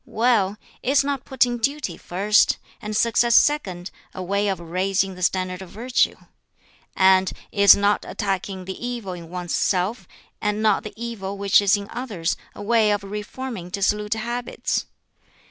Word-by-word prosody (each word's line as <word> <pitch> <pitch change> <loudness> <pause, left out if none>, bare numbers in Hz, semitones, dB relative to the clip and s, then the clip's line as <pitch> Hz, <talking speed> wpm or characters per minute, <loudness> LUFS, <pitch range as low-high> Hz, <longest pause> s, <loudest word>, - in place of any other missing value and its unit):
"Well, 215 -4 +1 0.2
is 275 +2 +3
not 275 -2 -3
putting 245 -2 +1
duty 275 - -1
first, 205 +4 +2 0.2
and 210 0 -3
success 235 +1 +3
second, 190 -12 +2 0.2
a 185 - -4
way 200 +3 0
of 195 -2 -1
raising 190 +3 -1
the 180 - -11
standard 185 0 0
of 190 - -9
virtue? 240 +6 +1 0.8
And 190 0 +4 0.2
is 200 0 +7
not 205 +1 +2
attacking 195 -2 -3
the 190 +5 -7
evil 240 -6 -4
in 170 -2 -9
one's 180 -1 -4
self, 195 +5 0 0.3
and 210 0 0
not 215 -2 +3
the 210 - -8
evil 210 -4 -5
which 200 0 +4
is 200 0 +4
in 200 0 -7
others, 210 -10 -2 0.2
a - - -8
way 220 0 +3
of 205 -1 0
reforming 210 0 -6
dissolute 210 +2 0
habits? 240 +2 -3
205 Hz, 155 wpm, -23 LUFS, 190-235 Hz, 0.8 s, is